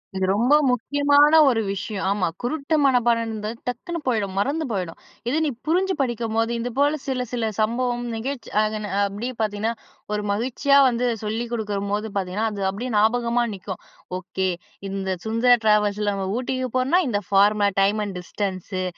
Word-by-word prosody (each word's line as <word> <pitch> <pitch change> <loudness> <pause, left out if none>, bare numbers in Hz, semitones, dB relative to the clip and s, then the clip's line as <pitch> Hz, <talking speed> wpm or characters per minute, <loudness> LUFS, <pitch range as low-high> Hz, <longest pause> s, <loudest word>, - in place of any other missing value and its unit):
இது 190 - 0
ரொம்ப 240 +8 +3 0.2
முக்கியமான 285 +4 +4 0.2
ஒரு 230 -3 +1
விஷயம். 200 +1 -4
ஆமா, 200 -3 +1
குருட்டு 285 +5 -1
மனப்பாடம்ன்றது 230 -4 +1
டக்குனு 335 +8 -3
போயிடும். 205 -6 0
மறந்து 295 +8 0
போயிடும். 180 -5 -3 0.3
இது 295 - +1
நீ - - +1 0.2
புரிஞ்சு 375 +3 +2
படிக்கும்போது 230 -2 -1
இது 245 - -2
போல 290 +2 +3
சில 255 -2 -1
சில 230 -3 -1
சம்பவம் 240 +2 0
நிகழ்ச்சி 255 +2 -5
ஆதன 215 -2 -3
அப்பிடியே 210 +6 -4
பார்த்தீங்கன்னா, 215 +2 -1 0.4
ஒரு 210 - 0
மகிழ்ச்சியா 260 +6 +2
வந்து 245 0 -1 0.2
சொல்லிக் 230 +3 -3
கொடுக்கும்போது 205 -1 -2
பார்த்தீங்கன்னா, 195 +3 -1
அது 200 - -5
அப்பிடியே 235 +6 -4
ஞாபகமா 235 +2 +2
நிக்கும். 190 -1 -7 0.4
ஓகே. 190 +1 -2 0.4
இந்த 195 0 -3 0.2
சுந்தரா 230 +3 +4
டிராவல்ஸ்ல 210 -1 +3
நம்ம 195 -1 -3
ஊட்டிக்கு 255 0 -2
போறோன்னா, 275 +9 +3
இந்த 205 - 0
ஃபார்ம 205 +1 +4
டைம் 205 +2 +2
அண்ட் 195 -3 -6
டிஸ்டன்ஸு 185 0 -4
225 Hz, 150 wpm, -23 LUFS, 205-250 Hz, 0.4 s, முக்கியமான